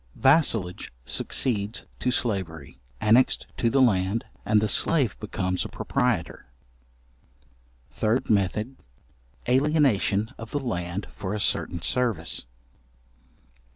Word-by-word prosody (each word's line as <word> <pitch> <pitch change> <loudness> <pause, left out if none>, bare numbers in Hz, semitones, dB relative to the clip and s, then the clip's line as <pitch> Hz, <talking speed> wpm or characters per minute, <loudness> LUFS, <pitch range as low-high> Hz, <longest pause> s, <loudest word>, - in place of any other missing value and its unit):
Vassalage 130 - +2
succeeds 105 - -1
to 125 - 0
slavery, 90 - -2 0.2
annexed 115 +4 +3
to 115 - +2
the 135 - +2
land, 100 -1 +1 0.2
and 105 0 +4
the 110 - 0
slave 125 - +2
becomes 95 -3 -2
a - - -6
proprietor. - - -2 1.4
Third 110 +4 0
method; 105 +5 0 0.7
alienation 125 -6 +2
of 115 0 -8
the 145 - -2
land 90 -6 -3
for 95 +1 -4
a - - -3
certain 85 -3 0
service. 110 - +1
110 Hz, 105 wpm, -25 LUFS, 95-125 Hz, 1.4 s, and